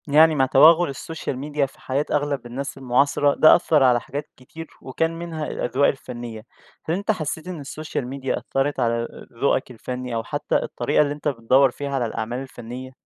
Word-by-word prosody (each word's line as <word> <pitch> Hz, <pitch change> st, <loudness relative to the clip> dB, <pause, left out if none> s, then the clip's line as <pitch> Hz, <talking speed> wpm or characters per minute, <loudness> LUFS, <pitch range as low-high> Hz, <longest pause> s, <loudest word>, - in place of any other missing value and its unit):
يعني 155 Hz, +2 st, +6 dB
مع 135 Hz, -2 st, +3 dB
تَوَغُّل 155 Hz, +4 st, +6 dB
الSocial 160 Hz, 0 st, -5 dB
Media 145 Hz, +2 st, -1 dB
في 135 Hz, -, -14 dB
حياة 140 Hz, +3 st, -1 dB
أغلب 145 Hz, -3 st, -1 dB
الناس 135 Hz, +4 st, -5 dB
المُعاصَرة، 140 Hz, +2 st, +2 dB
ده 155 Hz, -, +7 dB
أثَّر 155 Hz, -4 st, +3 dB
على 125 Hz, -2 st, +5 dB
حاجات 145 Hz, +4 st, -6 dB
كتير، 160 Hz, +6 st, -10 dB
وكان 165 Hz, +5 st, -2 dB
منها 165 Hz, -3 st, -4 dB
الأذواق 130 Hz, +4 st, +1 dB
الفنية، 120 Hz, -4 st, -5 dB, 0.4 s
هل 165 Hz, -, 0 dB
أنت 200 Hz, +3 st, 0 dB
حسّيت 160 Hz, -3 st, -4 dB
إن 170 Hz, -5 st, -6 dB
الSocial 155 Hz, 0 st, -5 dB
Media 135 Hz, +1 st, -3 dB
أثَّرَت 135 Hz, +2 st, -1 dB
على 115 Hz, 0 st, +2 dB
ال -, -, -10 dB
ذوقك 135 Hz, -2 st, +1 dB
الفني، 125 Hz, +1 st, -5 dB
أو 115 Hz, -, -1 dB
حتّى -, -, -2 dB
الطريقة -, -, +1 dB
اللي 145 Hz, -1 st, +1 dB
أنت 145 Hz, 0 st, -5 dB
بتدَوَّر 130 Hz, 0 st, +3 dB
فيها 140 Hz, +3 st, -5 dB
على 125 Hz, -3 st, 0 dB
الأعمال 115 Hz, +2 st, -3 dB
الفنية؟ 130 Hz, -1 st, -8 dB
140 Hz, 185 wpm, -23 LUFS, 125-150 Hz, 0.4 s, ده